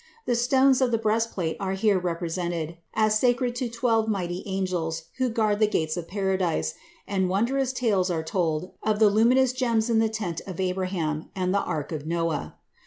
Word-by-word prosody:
The -, -, +1 dB
stones 260 Hz, +2 st, +4 dB
of 255 Hz, -, +3 dB
the 230 Hz, -, +2 dB
breastplate 215 Hz, -6 st, -1 dB
are 190 Hz, -1 st, -2 dB
here 195 Hz, 0 st, +2 dB
represented 170 Hz, -1 st, -3 dB, 0.2 s
as 215 Hz, 0 st, +3 dB
sacred 245 Hz, 0 st, +2 dB
to 245 Hz, -1 st, -2 dB
twelve 230 Hz, -2 st, +1 dB
mighty 180 Hz, -4 st, -2 dB
angels 180 Hz, -4 st, -2 dB, 0.2 s
who 255 Hz, -1 st, +2 dB
guard 215 Hz, -2 st, +1 dB
the 215 Hz, -, +4 dB
gates 160 Hz, -6 st, 0 dB
of 175 Hz, -2 st, -5 dB
Paradise, 190 Hz, -, 0 dB, 0.3 s
and 190 Hz, -2 st, 0 dB
wondrous 250 Hz, +7 st, +1 dB
tales 210 Hz, -8 st, +1 dB
are 165 Hz, -2 st, -1 dB
told 165 Hz, 0 st, -1 dB
of 215 Hz, -1 st, +1 dB
the 210 Hz, -1 st, +5 dB
luminous 245 Hz, +4 st, +4 dB
gems 235 Hz, -3 st, +1 dB
in 225 Hz, -, +4 dB
the 225 Hz, 0 st, +2 dB
tent 205 Hz, -7 st, -3 dB
of 185 Hz, -2 st, -7 dB
Abraham 180 Hz, -4 st, -2 dB
and 185 Hz, -1 st, 0 dB
the 200 Hz, -, +2 dB
ark 150 Hz, -2 st, -3 dB
of 155 Hz, -1 st, -5 dB
Noah. 165 Hz, -2 st, -2 dB
195 Hz, 180 wpm, -26 LUFS, 175-225 Hz, 0.3 s, the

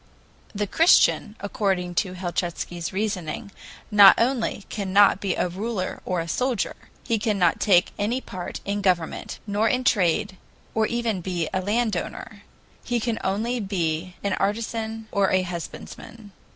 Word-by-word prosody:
The 205 Hz, +1 st, 0 dB
Christian, 220 Hz, -, +4 dB
according 195 Hz, -3 st, -1 dB
to 190 Hz, -4 st, -7 dB
Helchitsky's 175 Hz, -1 st, -3 dB
reasoning, 200 Hz, 0 st, -3 dB, 0.4 s
not 205 Hz, -2 st, +9 dB
only 235 Hz, -4 st, 0 dB
cannot 200 Hz, -1 st, +3 dB
be 195 Hz, -3 st, 0 dB
a -, -, 0 dB
ruler 190 Hz, +2 st, -4 dB
or 180 Hz, -1 st, -1 dB
a 165 Hz, -, -3 dB
soldier; 250 Hz, +4 st, -1 dB, 0.3 s
he 230 Hz, -2 st, 0 dB
cannot 200 Hz, -6 st, +2 dB
take 185 Hz, -3 st, +4 dB
any 225 Hz, +5 st, 0 dB
part 185 Hz, -8 st, -7 dB
in 205 Hz, +1 st, -2 dB
government 180 Hz, -4 st, -1 dB
nor 210 Hz, +2 st, +1 dB
in 255 Hz, +2 st, 0 dB
trade, 195 Hz, -3 st, +2 dB, 0.4 s
or 220 Hz, -1 st, +2 dB
even 235 Hz, -5 st, -1 dB
be 175 Hz, -2 st, -2 dB
a 190 Hz, -, 0 dB
landowner; 220 Hz, +3 st, -2 dB, 0.4 s
he 245 Hz, -1 st, -1 dB
can 230 Hz, 0 st, -2 dB
only 225 Hz, +6 st, -1 dB
be 180 Hz, -3 st, -2 dB
an 200 Hz, -1 st, 0 dB
artisan 220 Hz, +2 st, -2 dB
or 200 Hz, -1 st, +2 dB
a 185 Hz, 0 st, +2 dB
husbandman. 185 Hz, +5 st, -8 dB
200 Hz, 140 wpm, -24 LUFS, 185-225 Hz, 0.4 s, not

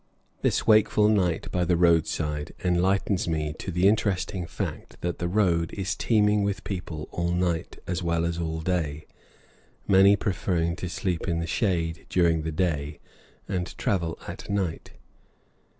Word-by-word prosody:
This -, -, +1 dB
wakeful 105 Hz, -1 st, +5 dB
night 90 Hz, -6 st, +1 dB
by 90 Hz, -, +1 dB
the 85 Hz, 0 st, +2 dB
roadside 80 Hz, -3 st, +1 dB
enlightens 95 Hz, +1 st, +1 dB
me 75 Hz, -2 st, -1 dB
to -, -, -5 dB
the 90 Hz, +2 st, +3 dB
interesting 95 Hz, -4 st, 0 dB
fact -, -, -6 dB
that 85 Hz, -1 st, -3 dB
the 85 Hz, -, -1 dB
road 85 Hz, -4 st, +1 dB
is 95 Hz, -3 st, -2 dB
teeming 105 Hz, -2 st, +3 dB
with 100 Hz, -1 st, -1 dB
people 85 Hz, -5 st, -5 dB
all 85 Hz, 0 st, -1 dB
night 90 Hz, -2 st, -1 dB
as 90 Hz, +1 st, -2 dB
well 85 Hz, -1 st, 0 dB
as 85 Hz, 0 st, -2 dB
all 80 Hz, -1 st, -3 dB
day, 80 Hz, -4 st, -2 dB, 0.8 s
many 100 Hz, +1 st, +6 dB
preferring 85 Hz, -4 st, -1 dB
to 90 Hz, -, -4 dB
sleep 90 Hz, 0 st, -2 dB
in 85 Hz, -2 st, 0 dB
the 85 Hz, -, -1 dB
shade 85 Hz, -2 st, -1 dB
during 85 Hz, -3 st, +3 dB
the 80 Hz, +1 st, -3 dB
day 75 Hz, -3 st, -1 dB, 0.5 s
and 90 Hz, -2 st, -3 dB
travel 90 Hz, -9 st, -1 dB
at -, -, -8 dB
night. 95 Hz, -5 st, -2 dB
90 Hz, 150 wpm, -26 LUFS, 80-95 Hz, 0.8 s, many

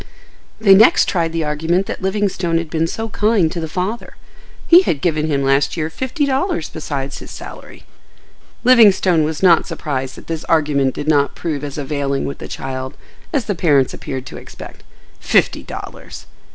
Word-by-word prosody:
They 205 Hz, -3 st, +6 dB
next 215 Hz, +4 st, +6 dB
tried 165 Hz, -3 st, 0 dB
the 165 Hz, -1 st, -2 dB
argument 160 Hz, +5 st, 0 dB
that -, -, -6 dB
Livingstone 190 Hz, -3 st, 0 dB
had 165 Hz, -2 st, -4 dB
been 165 Hz, 0 st, 0 dB
so 225 Hz, +6 st, -4 dB
kind 210 Hz, -6 st, +1 dB
to 175 Hz, -, -4 dB
the 160 Hz, -, -3 dB
father. 190 Hz, +8 st, -4 dB, 0.5 s
He 345 Hz, +2 st, +8 dB
had 160 Hz, -, -1 dB
"given 155 Hz, 0 st, 0 dB
him 140 Hz, -3 st, 0 dB
last 135 Hz, +3 st, +1 dB
year 160 Hz, 0 st, -2 dB
fifty 260 Hz, -, -2 dB
dollars 270 Hz, -, -1 dB
besides 140 Hz, -3 st, -5 dB
his -, -, -11 dB
salary." -, -, -11 dB, 0.8 s
Livingstone 200 Hz, -9 st, +5 dB
was 155 Hz, +3 st, -3 dB
not 170 Hz, -3 st, +5 dB
surprised 130 Hz, -3 st, -4 dB
that -, -, -13 dB
this 165 Hz, -1 st, -4 dB
argument 145 Hz, -5 st, +1 dB
did 145 Hz, -, -5 dB
not 145 Hz, -2 st, +2 dB
prove 150 Hz, -4 st, -4 dB
as 145 Hz, 0 st, -6 dB
availing 140 Hz, -1 st, -2 dB
with 140 Hz, -, -5 dB
the -, -, -7 dB
child 130 Hz, +1 st, -6 dB, 0.3 s
as 280 Hz, -, 0 dB
the 205 Hz, -, -1 dB
parents 145 Hz, -7 st, +2 dB
appeared 130 Hz, -2 st, -6 dB
to -, -, -9 dB
expect.—Fifty -, -, -3 dB
dollars! -, -, -9 dB
160 Hz, 170 wpm, -18 LUFS, 145-195 Hz, 0.8 s, He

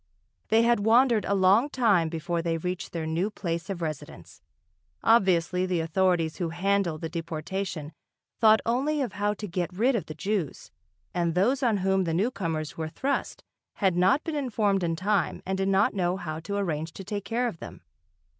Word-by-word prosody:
They 225 Hz, +1 st, +4 dB
had 235 Hz, -1 st, +3 dB
wandered 230 Hz, +1 st, +4 dB
a 200 Hz, -, +1 dB
long 200 Hz, +8 st, +4 dB
time 205 Hz, -, +2 dB
before 165 Hz, +1 st, -2 dB
they 165 Hz, -1 st, -1 dB
reached 180 Hz, +2 st, -4 dB
their 165 Hz, -2 st, -3 dB
new 165 Hz, +6 st, 0 dB
place 170 Hz, -4 st, -4 dB
of 180 Hz, -3 st, -4 dB
residence. 155 Hz, -3 st, -7 dB, 0.6 s
Obviously, 185 Hz, -4 st, +3 dB
the 180 Hz, -2 st, 0 dB
authorities 165 Hz, -1 st, +1 dB
who 175 Hz, -2 st, -2 dB
handled 180 Hz, -2 st, 0 dB
the 165 Hz, -, -2 dB
deportation 165 Hz, 0 st, -4 dB, 0.5 s
thought 220 Hz, -1 st, +6 dB
only 275 Hz, +5 st, +1 dB
of 235 Hz, -8 st, -5 dB
how 205 Hz, +2 st, 0 dB
to 210 Hz, +1 st, -6 dB
get 175 Hz, 0 st, -2 dB
rid 230 Hz, +9 st, +2 dB
of 230 Hz, -, -2 dB
the 155 Hz, -, -7 dB
Jews, 185 Hz, -2 st, -3 dB, 0.4 s
and 170 Hz, -2 st, 0 dB
those 245 Hz, +9 st, +2 dB
on 235 Hz, -5 st, +2 dB
whom 190 Hz, -1 st, +2 dB
the 165 Hz, -1 st, -1 dB
newcomers 165 Hz, -, -2 dB
were 160 Hz, -1 st, -4 dB
thrust 275 Hz, -, -3 dB, 0.3 s
had 190 Hz, -3 st, +1 dB
not 190 Hz, +11 st, +3 dB
been 325 Hz, -, -4 dB
informed 215 Hz, -9 st, 0 dB
in 165 Hz, -1 st, 0 dB
time 195 Hz, +1 st, 0 dB
and 190 Hz, -, -1 dB
did 195 Hz, 0 st, +1 dB
not 195 Hz, +1 st, +3 dB
know 180 Hz, -2 st, 0 dB
how 155 Hz, -4 st, -5 dB
to 165 Hz, +5 st, -5 dB
arrange 160 Hz, -5 st, -2 dB
to 195 Hz, -, -8 dB
take 205 Hz, +1 st, -5 dB
care 235 Hz, +4 st, 0 dB
of 180 Hz, -9 st, -6 dB
them. -, -, -10 dB
190 Hz, 185 wpm, -27 LUFS, 165-210 Hz, 0.6 s, thought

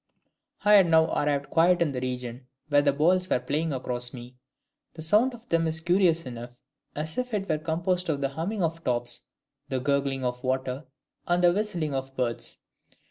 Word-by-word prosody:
"I 210 Hz, -, +6 dB
had 195 Hz, -4 st, +7 dB
now 160 Hz, -1 st, +4 dB
arrived 145 Hz, -1 st, 0 dB
quite 175 Hz, +2 st, +4 dB
in 165 Hz, -4 st, +2 dB
the 125 Hz, -2 st, -4 dB
region 125 Hz, 0 st, -5 dB, 0.2 s
where 145 Hz, -1 st, +5 dB
the 145 Hz, -1 st, +3 dB
balls 180 Hz, +6 st, +2 dB
were -, -, +2 dB
playing 155 Hz, +4 st, -1 dB
across 125 Hz, -2 st, -2 dB
me: 125 Hz, +1 st, -10 dB, 0.6 s
the 160 Hz, -, -6 dB
sound 220 Hz, +10 st, +3 dB
of 235 Hz, +1 st, -17 dB
them 165 Hz, -1 st, +2 dB
is 160 Hz, 0 st, -1 dB
curious 170 Hz, -1 st, +2 dB
enough, 120 Hz, -1 st, -8 dB, 0.4 s
as 155 Hz, +7 st, -3 dB
if 250 Hz, -3 st, -2 dB
it 200 Hz, -1 st, -2 dB
were 155 Hz, -2 st, 0 dB
composed 175 Hz, +3 st, -1 dB
of 145 Hz, -3 st, 0 dB
the 135 Hz, -1 st, 0 dB
humming 175 Hz, +8 st, -3 dB
of 165 Hz, 0 st, -2 dB
tops, 120 Hz, -1 st, -1 dB, 0.5 s
the 130 Hz, -2 st, -1 dB
gurgling 140 Hz, 0 st, 0 dB
of 125 Hz, 0 st, -3 dB
water, 130 Hz, +2 st, -2 dB, 0.4 s
and 175 Hz, 0 st, +2 dB
the 175 Hz, 0 st, +6 dB
whistling 180 Hz, -7 st, -1 dB
of 135 Hz, 0 st, -4 dB
birds. 120 Hz, -3 st, -2 dB
155 Hz, 190 wpm, -27 LUFS, 130-175 Hz, 0.6 s, had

